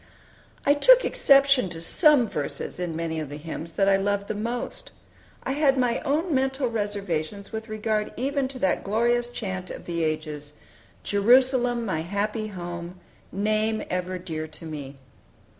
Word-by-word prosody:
I 285 - +6
took - - +6
exception 275 -6 +4
to 165 - -7
some 280 - +4
verses 150 0 -4
in 175 -3 -3
many 160 -1 -2
of 155 -3 -5
the 145 - -6
hymns 160 +1 -7
that 195 +2 +2
I 195 0 +5
loved 200 +1 -1
the - - 0
most. 230 +4 -4 0.5
I - - -2
had 275 -1 +3
my 245 -2 +1
own 310 +4 0
mental 265 0 +1
reservations 200 -4 -3
with 220 0 -6
regard 215 0 -1
even 275 +1 0
to 265 0 -7
that 190 -7 0
glorious 235 +4 +1
chant 190 -6 -5
of - - -8
the 170 -1 -2
ages, 155 -2 -3 0.5
"Jerusalem, 245 +3 +3
my 185 -6 -1
happy 205 +6 -2
home, 175 -2 -7 0.3
Name 215 +2 0
ever 180 0 -2
dear 160 -3 -5
to 155 +1 -12
me." 145 -3 -7
205 Hz, 160 wpm, -25 LUFS, 170-245 Hz, 0.5 s, I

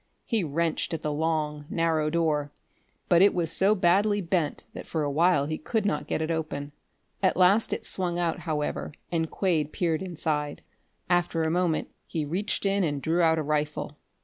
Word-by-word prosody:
He 225 -5 0
wrenched 165 +2 -1
at 160 - -7
the 150 - -1
long, 150 -1 -1
narrow 160 -2 +1
door, 150 -3 0 0.6
but 175 -1 +5
it 200 - +5
was 170 -2 0
so 200 +5 +4
badly 200 +3 +3
bent 170 -5 -1
that - - -8
for 160 -2 -1
a 145 - -1
while 150 -1 +3
he 155 +1 -3
could 220 +6 -1
not 205 - -1
get 160 - -1
it 160 - -2
open. 155 -3 -3 0.5
At 190 - +2
last 190 +4 +4
it - - -3
swung 175 -2 0
out, 175 +1 0
however, 155 -3 -3 0.2
and 165 -2 0
Quade 160 -6 0
peered 165 -3 0
inside. 155 -5 -3 0.4
After 175 -2 +1
a 160 - 0
moment 175 -2 0 0.2
he 155 -3 -2
reached 185 +8 -2
in 195 0 +2
and 145 -4 -1
drew 165 +5 +1
out 160 -1 +4
a 155 - 0
rifle. 150 0 -2
165 Hz, 185 wpm, -27 LUFS, 150-180 Hz, 0.6 s, but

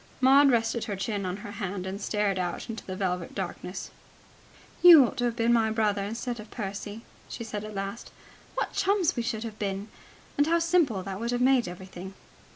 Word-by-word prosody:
Maud 275 +2 +6
rested 230 -2 +1
her 205 -3 -3
chin 195 0 -2
on 180 +1 -3
her 205 - -6
hand, 195 -3 -4
and 195 +2 -5
stared 205 -2 0
out 180 +5 -3
into 225 - -7
the 185 - -6
velvet 180 -3 -2
darkness. 185 -1 -5 0.9
"You 335 -6 +10
ought - - -5
to 245 - +1
have 235 -1 0
been 235 0 +2
my 225 -2 +3
brother 210 -2 +1
instead 235 +3 -4
of 215 - -10
Percy," 205 +1 -6 0.3
she - - -6
said 210 -2 -5
at 215 -1 -8
last. 195 +3 -5 0.5
"What - - -2
chums 390 -3 +2
we 240 - -1
should 230 -1 -3
have 220 -2 -7
been! 200 +1 -3 0.5
And 290 - +4
how 335 +1 +4
simple 330 - +2
that 195 0 -5
would 235 +1 -2
have 245 0 0
made 255 -2 +4
everything!" 185 +1 -9
215 Hz, 200 wpm, -28 LUFS, 195-240 Hz, 0.9 s, You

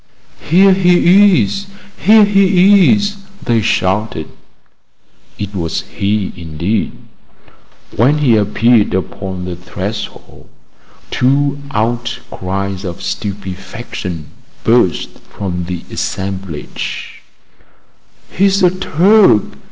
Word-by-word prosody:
"Here 190 +4 +6
he 180 - +5
is! 195 - -4 0.3
here 215 0 +5
he 195 -1 +5
is!" 205 -1 0 0.3
they 115 -2 +2
shouted. 95 -4 -1 1.1
It 105 0 -5
was 85 -4 -2
he 100 0 -1
indeed. 85 +5 -3 1.0
When 130 +7 +3
he 135 -6 +3
appeared 105 +1 +2
upon 95 -1 -4
the 90 -1 -5
threshold, 95 +4 -7 0.6
two 140 +2 +1
outcries 100 -5 -3
of 90 -3 -6
stupefaction 95 -4 -6 0.3
burst 115 -6 +1
from 90 -3 -4
the 90 -1 -5
assemblage: 95 -5 -5 1.1
"He's 195 +1 +2
a 180 - +5
Turk!" 185 - +4
110 Hz, 90 wpm, -15 LUFS, -, 1.1 s, Here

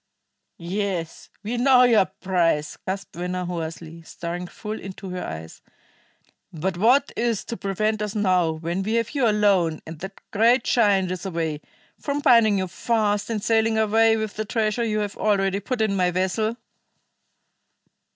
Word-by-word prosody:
"Yes, 180 -2 -4
we 230 +4 -3
know 250 0 +5
your 230 -6 +5
price!" 170 -7 0
gasped 195 -1 -4
Venner 180 +1 -3
hoarsely, 165 -1 -6
staring 175 +2 -6
full 215 +4 -6
into 190 0 -8
her 180 0 -4
eyes. 80 +1 -8 0.9
"But 175 +3 -3
what 245 +9 +3
is 230 -3 -1
to 235 - -5
prevent 215 +1 -1
us 210 0 -3
now, 185 -5 +2
when 165 +3 -3
we 215 +3 -2
have 230 -1 0
you 275 -5 +1
alone, 200 -7 +2
and 160 -1 -9
that 190 +3 -8
great 235 +4 +4
giant 200 -6 +2
is 185 -1 -4
away, 160 -4 -3 0.4
from 285 0 -2
binding 230 -7 +5
you 190 -1 -1
fast 210 +1 0
and 215 -3 -2
sailing 225 0 +2
away 225 +1 +4
with 220 -1 -4
the 215 - -1
treasure 220 +1 0
you 215 -2 0
have 205 -1 -4
already 195 -2 +1
put 230 +4 -3
in 215 -2 +1
my 180 -2 +2
vessel?" 190 +6 -1
200 Hz, 160 wpm, -24 LUFS, 180-220 Hz, 0.9 s, know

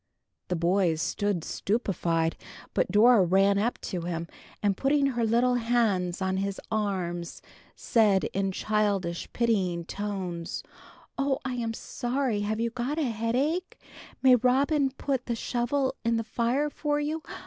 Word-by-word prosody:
The 180 - -1
boys 170 -1 +2
stood 200 0 -1
stupefied, 170 -7 0 0.4
but - - +1
Dora 220 0 +6
ran 195 +3 +3
up 235 +4 0
to 180 - -4
him, 170 -1 -3 0.4
and 200 -2 +2
putting 275 +5 +2
her 245 -4 0
little 235 +3 +3
hands 225 -7 +1
on 190 0 0
his 195 0 -2
arms, 185 -5 -2 0.3
said, 210 -5 +3
in 195 0 0
childish 200 -4 -1
pitying 190 -8 0
tones, 185 -4 -4 0.6
"Oh, 275 -1 +1
I 260 - -2
am 230 -2 -2
so 240 - -6
sorry! 255 -4 +1
Have 215 +1 -1
you 230 0 0
got 255 +5 -3
a 320 - +1
headache? 260 +11 -1 0.5
May 260 -1 +8
Robin 270 +4 +2
put 265 -1 -3
the 235 - 0
shovel 255 +4 -1
in 230 0 +2
the 225 - -1
fire 250 +7 0
for 295 0 -1
you? 305 +2 -2
220 Hz, 150 wpm, -28 LUFS, 190-250 Hz, 0.6 s, May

